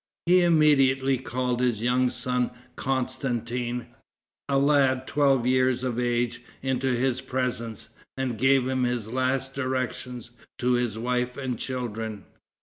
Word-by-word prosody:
He 180 +2 +5
immediately 135 -6 +4
called 125 -1 -2
his 120 -3 0
young 125 +1 +3
son 125 0 -1 0.3
Constantin, 125 -2 -2 0.6
a 140 - +3
lad 135 -2 +3
twelve 135 -4 +2
years 130 0 +2
of 125 -2 -1
age, 120 0 0 0.2
into 130 0 0
his 130 +1 0
presence, 120 -4 -3 0.3
and 130 -3 -1
gave 130 +1 +4
his 125 -3 -1
last 130 +1 0
directions 130 -2 -3 0.3
to 125 0 +1
his 120 -3 0
wife 125 +1 -1
and 130 -4 -3
children. 115 -5 -4
125 Hz, 125 wpm, -26 LUFS, 120-130 Hz, 0.6 s, He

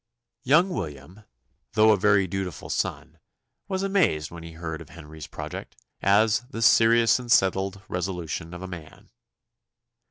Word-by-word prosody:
Young 155 +8 +4
William, 90 - -7 0.5
though 110 +1 +5
a - - +5
very 100 0 +3
dutiful 95 -2 -5
son, - - -3 0.5
was 190 -1 -2
amazed 180 - +1
when 85 -1 -9
he 85 0 -10
heard 80 -1 -6
of 80 - -12
Henry's 80 -1 -11
project, - - -8 0.3
as 105 +4 +4
"the 115 -4 -4
serious 115 +1 +5
and 120 -2 -6
settled 95 -1 +2
resolution 90 -2 -4
of 90 - -8
a - - -5
man." 85 -4 -11
95 Hz, 140 wpm, -25 LUFS, 85-115 Hz, 0.5 s, though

